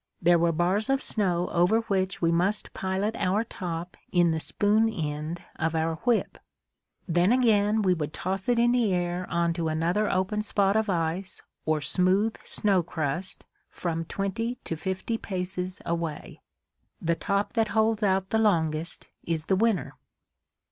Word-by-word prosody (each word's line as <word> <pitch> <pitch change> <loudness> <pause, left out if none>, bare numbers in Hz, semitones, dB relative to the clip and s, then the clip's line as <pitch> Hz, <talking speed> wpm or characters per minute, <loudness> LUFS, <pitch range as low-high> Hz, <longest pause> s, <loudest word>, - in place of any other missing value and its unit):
There 175 0 +4
were 170 0 +3
bars 180 +7 0
of 270 0 +1
snow 180 -5 0
over 180 +7 +3
which 190 -4 -1
we 165 - +4
must 185 +5 0
pilot 190 +4 -1
our 200 +5 +1
top 175 -5 -5 0.2
in 175 -3 +4
the 160 - -1
spoon 210 +6 +2
end 155 -3 -4
of 160 +1 -1
our 160 0 0
whip; 240 -3 +1 0.7
then 175 +3 +3
again 220 -4 +3
we 185 -2 +4
would 155 -3 -3
toss 190 +6 -3
it 240 - +3
in 240 +1 +4
the 240 -4 +2
air 175 0 -2
on 170 -1 +1
to 165 -1 -2
another 170 +7 +1
open 190 +3 0
spot 200 -1 +1
of 220 -1 +1
ice 175 +1 -2 0.2
or 155 -1 +1
smooth 190 +8 +2
snow 195 -3 +3
crust 165 +2 -3 0.2
from 165 -2 -3
twenty 215 +7 -2
to 165 - -3
fifty 190 +7 -3
paces 185 -1 -4
away. 170 -3 -4 0.6
The 170 0 +1
top 200 +4 -1
that 225 -2 +2
holds 220 0 +1
out 190 -2 +1
the 220 - +2
longest 165 -6 0 0.2
is 160 -2 -2
the 190 - +2
winner. 210 - +1
185 Hz, 160 wpm, -27 LUFS, 170-210 Hz, 0.7 s, There